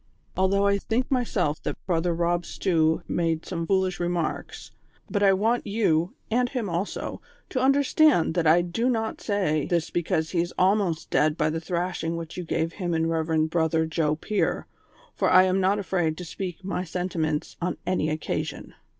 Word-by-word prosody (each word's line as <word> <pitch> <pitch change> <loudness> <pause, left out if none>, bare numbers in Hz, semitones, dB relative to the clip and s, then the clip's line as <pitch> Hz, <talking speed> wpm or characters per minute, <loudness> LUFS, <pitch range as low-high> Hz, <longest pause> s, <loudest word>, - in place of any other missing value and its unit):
Although 195 +2 +2
I 200 0 +3
think 240 +6 -1
myself 195 - 0
that - - -3
Brother 170 -1 0
Kob 175 0 +1
Stew 160 -2 +1
made 165 -2 -1
some 170 -2 -4
foolish 190 -2 +1
remarks; 175 -2 -3 0.4
but 205 - 0
I 200 -1 +6
want 220 +5 +1
you, 185 -5 +1 0.2
and 245 +2 +2
him 245 -5 -3
also, 175 +3 -3 0.3
to 255 - -1
understand 275 - +4
that 170 -2 +1
I 170 +3 +5
do 225 +9 -1
not 225 -3 -2
say 180 -8 0
this 170 -1 0
because 160 -2 -1
he 170 - +2
is 175 - -5
almost 185 -3 +1
dead 155 +1 +2
by 155 -1 +1
the 160 +1 -3
thrashing 170 -1 -2
which 165 -1 -7
you 180 - -4
gave 165 0 -1
him 175 -4 -2
and 160 0 +1
Eev. 160 -1 +1
Brother 160 -1 +2
Joe 160 -1 0
Pier, 205 +6 -1 0.5
for - - +1
I 185 - +7
am 190 +1 +2
not 190 +2 +3
afraid 175 -5 -1
to 180 - -6
speak 180 +2 -6
my 185 -1 -2
senti 180 0 -4
ments 155 -1 -1
on 180 +1 -1
any 180 -4 0
occasion. 155 0 -4
175 Hz, 180 wpm, -26 LUFS, 160-195 Hz, 0.5 s, I